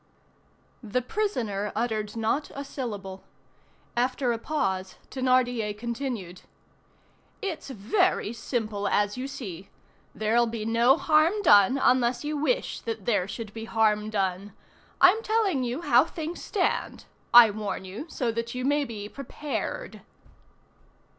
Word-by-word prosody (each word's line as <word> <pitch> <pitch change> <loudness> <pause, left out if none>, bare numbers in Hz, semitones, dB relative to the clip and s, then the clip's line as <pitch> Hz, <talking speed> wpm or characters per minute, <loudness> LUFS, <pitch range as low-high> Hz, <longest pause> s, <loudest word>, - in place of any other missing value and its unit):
The 240 +2 -2
prisoner 230 - -2
uttered 220 -2 -2
not 230 +6 -1
a 280 +1 -5
syllable. 205 -9 -6 0.7
After 250 +1 +1
a 230 - -2
pause, 190 -10 -2 0.2
Thénardier 245 -5 +1
continued:— 235 -6 -4 1.0
"It's 385 -9 -5
very 265 - +1
simple, 215 -4 -3
as 205 0 +1
you 255 +2 -4
see. 195 -9 -8 0.5
There'll 230 +2 +2
be 225 -1 -4
no 235 +5 +4
harm 325 +7 +3
done 205 - +6
unless 250 -1 +2
you 300 +1 -2
wish 310 +13 0
that 225 -4 -5
there 205 -6 +1
should 210 0 -7
be 225 0 -6
harm 215 -2 +1
done. 195 -1 -2 0.5
I'm 375 +5 +6
telling 425 - +1
you 250 +5 -3
how 255 -2 +5
things 330 +1 -6
stand. 395 -4 -1 0.3
I 235 -2 +9
warn 205 -2 -4
you 205 - -7
so 245 -6 -1
that 230 +2 -4
you 250 0 -3
may 290 +1 +2
be 210 -4 -6
prepared." 295 - -5
235 Hz, 130 wpm, -27 LUFS, 210-280 Hz, 1.0 s, I